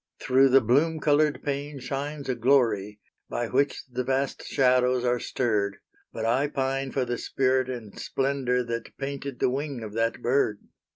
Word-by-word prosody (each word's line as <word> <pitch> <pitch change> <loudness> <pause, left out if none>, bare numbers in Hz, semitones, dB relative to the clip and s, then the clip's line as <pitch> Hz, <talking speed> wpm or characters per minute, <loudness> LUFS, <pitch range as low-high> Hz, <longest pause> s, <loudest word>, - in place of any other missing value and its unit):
Through 135 +1 +4
the 135 +1 +6
bloom 145 +8 +2
colored 150 0 +2
pane 145 0 -3
shines 140 +2 -4
a 130 - +1
glory 115 -5 +2 0.3
By 120 -1 -2
which 140 +2 +1
the 125 0 -3
vast 135 +1 -1
shadows 125 -1 +3
are 125 0 +2
stirred, 105 -6 -1 0.3
But 110 - -4
I 130 +5 +2
pine 135 -1 -2
for 130 -2 0
the 120 -1 -3
spirit 130 -1 +1
and 115 -5 -7
splendor 135 -2 0
That 115 0 -5
painted 140 -1 -5
the 125 - +1
wing 140 -3 -3
of 105 -1 -7
that 115 +1 0
bird. 120 -4 +2
130 Hz, 165 wpm, -26 LUFS, 120-140 Hz, 0.3 s, the